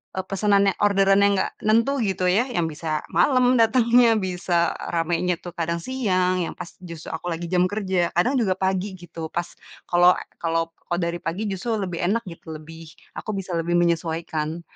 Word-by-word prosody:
eee, 190 - -2
pesanan 200 0 +3
yang - - -12
orderan, 195 -1 +4
yang 200 - +3
gak - - -4
nentu 230 +6 +2
gitu, 190 -2 -2
ya, 230 +7 +2
yang 230 -10 -1
bisa 155 0 -3
malam 255 -2 +4
datangnya, 235 0 +5
bisa 180 -3 0 0.2
ramainya 170 +1 0
tuh 175 - -7
kadang 170 0 -1
siang, 185 -8 0
yang - - -6
pas 170 - -7
justru 170 -3 -9
aku 160 +2 -5
lagi 170 +1 -5
jam 180 0 +3
kerja, 190 -4 0
kadang 245 +11 +2
juga 190 -4 +2
pagi 190 +1 -1
gitu, 165 -2 -7
pas 175 0 -2 0.4
kalau 175 +1 +6 0.3
kalau 165 0 0 0.2
kalau 175 0 -1
dari 170 0 -2
pagi, 170 +6 -3
justru 220 +5 -2
lebih 175 -3 -4
enak 230 +4 +1
gitu, 165 -1 -9
lebih, 160 +1 -12 0.3
aku 215 - -4
bisa 190 -1 -5
lebih 175 +1 0
menyesuaikan. 165 -1 -1
180 Hz, 180 wpm, -23 LUFS, 170-205 Hz, 0.4 s, kalau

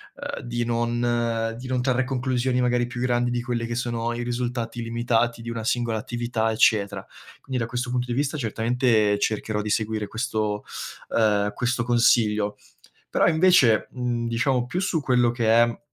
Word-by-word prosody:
ehm - - -6
di 120 0 -2
non 120 -1 0
di 130 - -7
non 125 -1 -1
trarre 130 0 +2
conclusioni 125 -1 0
magari 120 0 +1
più 120 0 -7
grandi 120 -1 +1
di 120 0 -2
quelli 120 -1 -2
che 120 - -3
sono 120 -1 -2
i 120 - -3
risultati 120 -1 -3
limitati 115 0 0
di 115 - -5
una 115 -1 -4
singola 115 -1 0
attività, 120 -1 -2
eccetera. 100 -3 +2 0.4
Quindi 130 -2 -3
da 115 - -1
questo 125 +1 -3
punto 125 0 -1
di 120 - -2
vista 145 +4 -1
certamente 115 -3 +1
cercherò 110 0 -1
di 105 - -4
seguire 110 0 -1
questo, 110 -3 -2 0.5
ehm, 105 -2 +2
questo 125 +1 -1
consiglio. 110 -3 +2 0.5
Però - - +3
invece, 160 -9 +4
mhmm, 120 -2 -2
diciamo 125 +1 +1
più 175 +9 -3
su 185 -4 0
quello 125 -3 +3
che 120 -1 -2
è, 115 +1 +4
120 Hz, 170 wpm, -24 LUFS, 115-125 Hz, 0.5 s, invece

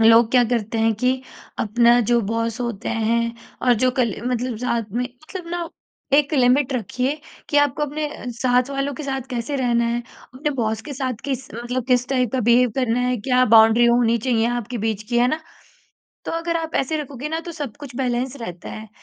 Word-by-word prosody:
लोग 225 0 +6
क्या 250 -1 +5
करते 225 -1 -1
हैं 225 0 +3
कि 250 +4 +2 0.5
अपना 235 +2 +4
जो 240 0 +4
बॉस 230 +2 -2
होते 235 -5 -3
हैं 230 +1 0 0.3
और 245 - +6
जो 255 - +4
कली 235 -6 +1
मतलब 250 -1 -1
साथ 235 -3 -2
में 240 +3 0
मतलब 310 +9 -9
ना 345 -1 -3 0.5
एक 290 +1 +3
लिमिट 260 +1 +3
रखिए 255 +5 -2 0.3
कि 290 - 0
आपको 290 0 +2
अपने 300 +1 -2 0.2
साथ 250 +2 +1
वालों 275 +1 -1
के 305 - -6
साथ 270 -2 -2
कैसे 245 +3 -2
रहना 240 -3 +2
है। 235 +1 0 0.3
अपने 295 +3 -2
बॉस 220 -3 -1
के - - -4
साथ 260 -1 -2
किस 265 -1 -3
मतलब 240 +2 -3
किस 250 -1 +2
टाइप 255 -4 +1
का 260 - +1
बिहेव 240 +1 +4
करना 250 -2 +1
है, 250 0 +1
क्या 250 +3 +2
बाउंड्री 225 +1 +6
होनी 235 -1 +4
चाहिए 230 -1 +1
आपके 240 0 -3
बीच 220 -1 -2
की 240 -1 +1
है 240 - +4
ना? 310 +4 -1 0.8
तो - - -4
अगर 335 0 -1
आप 325 -1 -4
ऐसे 275 +4 0
रखोगे 280 0 -6
ना 320 +1 -2
तो 340 +1 -8
सब 290 -8 -6
कुछ 280 -4 -9
बैलेंस 255 +1 -1
रहता 180 -6 -7
है। 220 0 -8
245 Hz, 200 wpm, -22 LUFS, 230-270 Hz, 0.8 s, लोग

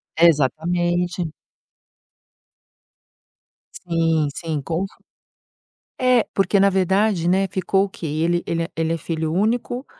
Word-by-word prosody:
Exatamente. 175 +3 +2 2.5
Sim, 165 -3 0
sim, 160 -3 -3
com 165 +6 -2
c 195 - -12 1.1
É, 255 -2 +3
porque, 195 +1 +2
na 200 - +5
verdade, 190 -1 +1
né, 190 +2 +3
ficou 190 +1 +1
o - - -4
quê? 180 - -7
Ele 165 +3 0
ele 165 0 -1
é - - -7
ele 165 0 0
é 165 - -2
filho 160 0 -3
único, 240 - -1
175 Hz, 120 wpm, -21 LUFS, 165-195 Hz, 2.5 s, na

